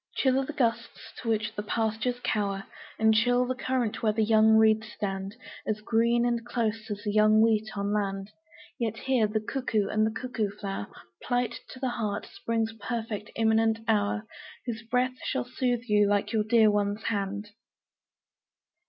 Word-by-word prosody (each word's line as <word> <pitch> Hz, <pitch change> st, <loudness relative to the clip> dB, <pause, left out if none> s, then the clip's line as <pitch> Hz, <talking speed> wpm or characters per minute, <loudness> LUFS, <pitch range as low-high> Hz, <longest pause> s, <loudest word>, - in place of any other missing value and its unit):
Chill 265 Hz, -1 st, +3 dB
are 270 Hz, -, -1 dB
the 305 Hz, -, -5 dB
gusts 240 Hz, -6 st, -2 dB
to 230 Hz, -, -3 dB
which 215 Hz, -1 st, 0 dB
the 210 Hz, -, -3 dB
pastures 225 Hz, +3 st, -1 dB
cower, 200 Hz, -2 st, -1 dB, 0.3 s
And 220 Hz, 0 st, +4 dB
chill 245 Hz, +3 st, +3 dB
the 255 Hz, -, -1 dB
current 255 Hz, -3 st, -1 dB
where 220 Hz, -, +3 dB
the 220 Hz, +1 st, +1 dB
young 220 Hz, 0 st, +5 dB
reeds 220 Hz, 0 st, +3 dB
stand 195 Hz, 0 st, -4 dB, 0.3 s
As 215 Hz, 0 st, 0 dB
green 235 Hz, +2 st, +2 dB
and 235 Hz, -1 st, 0 dB
close 225 Hz, -2 st, -2 dB
as 205 Hz, 0 st, -5 dB
the 210 Hz, -, -1 dB
young 215 Hz, +1 st, +5 dB
wheat 220 Hz, -1 st, +3 dB
on 200 Hz, +1 st, -1 dB
land 195 Hz, -1 st, -2 dB, 0.5 s
Yet 225 Hz, -2 st, -1 dB
here 255 Hz, -4 st, +2 dB
the 215 Hz, +1 st, -1 dB
cuckoo 215 Hz, -3 st, -1 dB
and 215 Hz, +1 st, +1 dB
cuckoo 230 Hz, -3 st, -2 dB
flower 195 Hz, -2 st, -4 dB, 0.3 s
Plight 245 Hz, -1 st, -1 dB
to 255 Hz, -, -10 dB
the 260 Hz, -1 st, -1 dB
heart 215 Hz, -3 st, -2 dB
Spring's 230 Hz, -, -2 dB
perfect 225 Hz, -2 st, -4 dB
imminent 225 Hz, 0 st, +2 dB
hour 215 Hz, 0 st, +1 dB, 0.4 s
Whose 230 Hz, -2 st, -4 dB
breath 250 Hz, +2 st, 0 dB
shall -, -, -1 dB
soothe 245 Hz, -1 st, -1 dB
you 210 Hz, -3 st, +3 dB
like 205 Hz, +2 st, +1 dB
your 215 Hz, -1 st, +2 dB
dear 220 Hz, -1 st, +5 dB
one's 205 Hz, +1 st, 0 dB
hand. 205 Hz, -1 st, -2 dB
220 Hz, 170 wpm, -28 LUFS, 210-235 Hz, 0.5 s, young